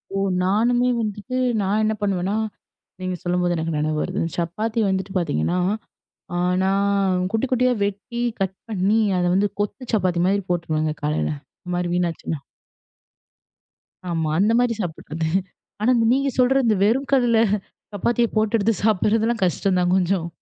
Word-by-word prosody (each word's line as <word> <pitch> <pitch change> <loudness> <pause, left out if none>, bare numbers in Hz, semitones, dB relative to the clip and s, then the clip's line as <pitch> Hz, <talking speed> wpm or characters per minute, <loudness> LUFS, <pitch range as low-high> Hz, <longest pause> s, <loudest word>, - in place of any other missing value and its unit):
ஓ. - - 0 0.3
நானும் 230 +6 +2 0.2
வந்துட்டு, 215 +4 -3 0.2
நான் 205 +3 +1
என்ன 215 0 +2
பண்ணுவேன்னா 195 0 0 0.7
நீங்கச் 185 -1 -4
சொல்லும்போது 175 0 +1
எனக்கு 160 0 -2
நெனைவு 155 0 0
வருது. 185 +2 -2 0.2
சப்பாத்தி 210 +7 -2
வந்துட்டு 190 0 -2
பாத்தீங்கன்னா, 175 - 0 1.0
நான் 195 -1 +1
குட்டி 225 +4 +1
குட்டியா 255 0 +3
வெட்டி 205 +4 -3 0.2
கட் 190 0 -1 0.2
பண்ணி, 205 +3 +2 0.2
அத 175 - +1
வந்து 205 +1 +3
கொத்து 240 +4 -4
சப்பாத்தி 180 -4 +1
மாதிரி 200 0 +1
போட்டுருவாங்க. 155 -3 0
காலைல 150 +1 0 0.3
இந்த 180 - -5
மாரி 175 0 -1
வீணாச்சுன்னா. 170 -3 -2 1.7
ஆமா. 160 -2 -1
அந்த 210 +4 +3
மாரி 245 -1 +2
சாப்பிடுறது. 160 -2 -4 0.5
ஆனா, 240 - +3 0.2
நீங்கச் 275 0 0
சொல்றது 250 -3 +4
வெறும் 260 +6 +2
கல்ல 245 -4 +4 0.6
சப்பாத்திய 235 +4 +1
போட்டு 215 +1 +2
எடுத்துச் 210 -1 0
சாப்பிடுறதெல்லாம் 220 +1 +2
கஷ்டம்தான் 180 0 +1
கொஞ்சம். 180 -2 +1
195 Hz, 130 wpm, -22 LUFS, 175-225 Hz, 1.7 s, சொல்றது